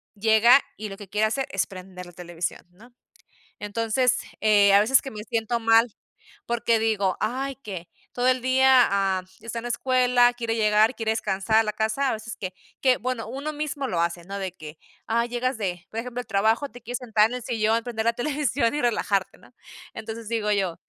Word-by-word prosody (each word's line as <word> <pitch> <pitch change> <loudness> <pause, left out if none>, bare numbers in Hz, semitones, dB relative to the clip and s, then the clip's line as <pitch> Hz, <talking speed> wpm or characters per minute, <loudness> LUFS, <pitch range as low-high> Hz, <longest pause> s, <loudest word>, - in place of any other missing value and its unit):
llega 220 +5 +5
y 215 0 -6
lo 195 - -8
que 205 - -11
quiere 210 +3 +1
hacer 265 +5 -2
es 195 - 0
prender 185 -1 -10
la - - -12
televisión, 175 0 -5
¿no? 230 +7 -19 0.7
Entonces, 230 +4 0 0.2
eh, 205 -2 +5
a 200 - +7
veces, 245 +6 +4
que 270 - -7
me 210 -3 -7
siento 230 +1 -1
mal 225 +1 +5 0.6
porque 235 -1 +1
digo: 210 -4 0
"Ay, 270 +4 -2
que 195 -9 -8 0.3
todo 250 +1 +1
el 255 0 +3
día, 260 0 +5
ah, 195 -2 +1 0.2
está 230 0 -6
en 230 - -7
la 240 - -3
escuela, 250 0 +3
quiere 230 -2 -3
llegar, 215 +2 +3
quiere 220 -1 0
descansar, 205 0 +1
a 225 - +5
la 215 -1 -3
casa", 220 +6 0
a - - +1
veces 220 0 -7
que 185 -2 -6 0.3
que, 255 -2 +4
bueno, 245 -1 -4
uno 275 +5 -4
mismo 295 -2 -3
lo 175 -9 -1
hace, 170 0 -1
no 200 +2 -6
de 185 -2 -5
que, 155 -1 -10 0.3
ah, 235 +1 +1
llegas 245 +1 -2
de, 180 -3 -4
por 225 - -3
ejemplo, 245 +1 -5
el - - -22
trabajo. 220 +8 +1
Te 245 - -13
quieres 245 +2 -5
sentar 220 -4 +2
en 245 - -4
el 250 - -7
sillón, 225 -1 0
prender 225 -2 -3
la 235 - +3
televisión 275 -2 0
y 295 - -1
relajarte, 200 -5 0
¿no? - - -21 0.4
Entonces, 220 0 -7
digo 220 -2 0
yo, 190 -5 0
225 Hz, 205 wpm, -25 LUFS, 205-245 Hz, 0.7 s, a